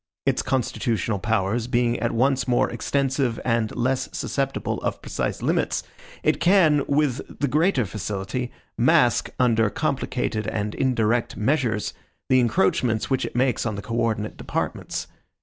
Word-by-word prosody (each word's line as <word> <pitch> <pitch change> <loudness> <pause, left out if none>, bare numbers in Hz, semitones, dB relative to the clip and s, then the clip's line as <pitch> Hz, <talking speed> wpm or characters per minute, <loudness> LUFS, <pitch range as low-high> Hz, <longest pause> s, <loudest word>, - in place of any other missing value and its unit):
Its - - +2
constitutional 110 -4 -1
powers 110 +3 0
being 120 -1 +1
at 115 - 0
once 135 +3 +1
more 125 -1 +3
extensive, 135 -3 0
and 115 -3 0
less 130 +2 0
susceptible 135 -1 -2
of - - -2
precise - - -3
limits, - - +1 0.4
it - - +2
can, 170 -6 +4
with 140 -3 +1 0.2
the 145 - +1
greater 150 - +2
facility, 105 +5 -4 0.3
mask, - - +4
under 115 -3 +3
complicated 125 -5 -2
and 105 -1 -2
indirect 120 -2 +1
measures, 120 -2 0 0.4
the 130 - +5
encroachments 125 - +1
which 130 - +1
it - - -7
makes 130 0 +2
on 110 -3 -2
the 100 - -5
co 115 - -6
ordinate 110 -2 -1
departments. - - -3
120 Hz, 140 wpm, -24 LUFS, 110-135 Hz, 0.4 s, the